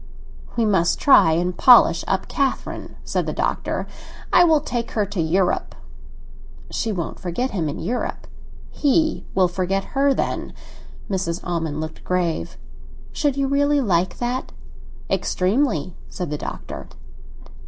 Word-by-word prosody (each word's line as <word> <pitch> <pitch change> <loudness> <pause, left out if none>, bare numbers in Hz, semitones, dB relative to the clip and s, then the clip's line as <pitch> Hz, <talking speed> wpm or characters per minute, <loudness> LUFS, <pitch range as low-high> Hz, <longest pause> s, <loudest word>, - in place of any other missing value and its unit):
"We 230 -2 +2
must 190 -5 +2
try 165 - +6
and 175 +2 0
polish 240 -9 +6
up 190 -1 -1
Catherine," 275 -2 -2
said - - -2
the - - -2
Doctor. - - -1 0.5
"I 350 - +7
will 320 -3 +5
take 235 -4 -4
her 210 -2 +1
to 200 -3 -3
Europe." 180 +3 0 1.0
"She 225 - -1
won't 175 -6 -4
forget 215 +9 -2
him 165 -6 -1
in - - -5
Europe." 230 +9 -3 0.5
"He 315 +2 +1
will 185 -1 +4
forget 185 +2 -1
her, 275 +1 +3
then." - - -2 0.5
Mrs. 180 -3 -2
Almond 165 -4 -2
looked 155 0 -7
grave. 170 - -1 0.5
"Should 290 -3 0
you 275 -1 +1
really 285 +1 +2
like 185 -8 +1
that?" 245 +2 -3 0.6
"Extremely!" 185 - 0
said 180 -5 -5
the - - -1
Doctor. - - -7
195 Hz, 135 wpm, -22 LUFS, 175-260 Hz, 1.0 s, I